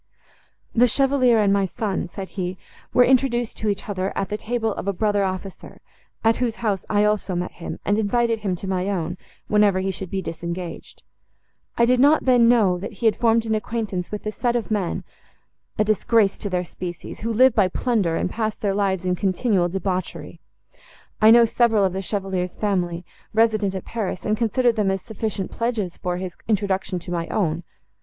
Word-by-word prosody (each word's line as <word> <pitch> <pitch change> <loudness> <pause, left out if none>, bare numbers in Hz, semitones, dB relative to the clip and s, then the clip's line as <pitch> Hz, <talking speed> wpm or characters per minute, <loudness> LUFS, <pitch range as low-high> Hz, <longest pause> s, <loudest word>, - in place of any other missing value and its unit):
"The 245 +1 +5
Chevalier 260 -1 +3
and 205 -2 +3
my 200 -1 +2
son," 190 -1 -3
said 195 -2 -6
he, 185 -1 -4 0.3
"were 250 - +6
introduced 245 -2 +2
to 215 - -1
each 200 -1 -3
other, 190 -1 -2
at 195 - -1
the 210 - -2
table 225 0 -2
of - - -6
a 200 - +1
brother 205 +1 +1
officer, 190 0 -5 0.4
at 225 0 +3
whose 240 -3 -1
house 200 -3 0
I 205 0 +3
also 210 -3 0
met 175 +1 -2
him, 170 - -7
and 205 +2 +2
invited 230 +2 +1
him 195 -4 -1
to 190 - -7
my 190 0 -1
own, 180 -2 -3 0.3
whenever 210 -2 +3
he 190 +1 -1
should 190 -1 -7
be 195 - -2
disengaged. 170 +1 -6 0.7
I 235 - +5
did 250 +1 +3
not 290 +4 +5
then 245 -3 +5
know, 200 -7 +3
that 200 - -6
he 230 - -6
had 220 - +4
formed 230 -1 +2
an 220 - 0
acquaintance 215 -4 -3
with 210 0 -5
a 215 - -1
set 240 +2 -1
of 230 -2 -2
men, 200 -5 -1 0.7
a - - +3
disgrace 215 0 +2
to 205 - -3
their 180 -1 0
species, 175 0 -7
who 230 +2 -2
live 255 +3 +5
by 205 -4 +4
plunder 195 -4 0
and - - 0
pass 220 +2 -2
their 200 -2 -1
lives 195 -2 0
in 180 - +1
continual 190 0 +1
debauchery. 185 0 -4 0.8
I 215 - +8
knew 235 +1 +8
several 225 -3 +3
of 185 - 0
the 190 - -2
Chevalier's 190 -2 -3
family, 180 -4 -1 0.3
resident 215 -3 +2
at 190 - -5
Paris, 210 -5 -4
and 215 - +2
considered 235 +1 +1
them 205 -2 +2
as 190 -1 -2
sufficient 215 -3 -4
pledges 225 -6 -2
for 180 -1 -2
his 185 -1 -5
introduction 195 -3 0
to 175 0 -7
my 170 -1 -2
own. 170 -5 -1
205 Hz, 195 wpm, -23 LUFS, 185-225 Hz, 0.8 s, I